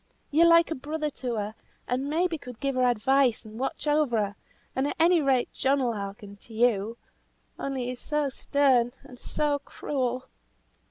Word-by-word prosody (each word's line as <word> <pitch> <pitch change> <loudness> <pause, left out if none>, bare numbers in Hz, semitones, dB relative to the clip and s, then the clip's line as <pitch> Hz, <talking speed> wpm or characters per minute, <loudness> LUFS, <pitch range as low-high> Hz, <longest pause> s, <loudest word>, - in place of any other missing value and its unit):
You're 330 +3 +6
like 335 0 +6
a - - +2
brother 300 +2 -3
to 250 -3 -4
her, 210 0 -3 0.3
and 260 +3 -1
maybe 330 +1 0
could 250 -4 -10
give 275 -1 -1
her 255 -1 +2
advice 245 +1 +2
and 215 +1 -10
watch 270 - -3
over 295 -5 +2
her, 205 -1 -1 0.4
and 265 +2 +1
at - - -3
any 335 0 +5
rate 265 -3 +1
John 275 +1 +2
will 245 -3 +1
hearken 200 0 -7
to 225 +2 -14
you; 225 -1 +2 0.6
only 270 -2 -2
he's 250 0 -4
so 300 -1 0
stern 260 -3 +2
and 250 - -13
so 295 -1 0
cruel." 255 -3 -3
260 Hz, 175 wpm, -27 LUFS, 235-290 Hz, 0.6 s, You're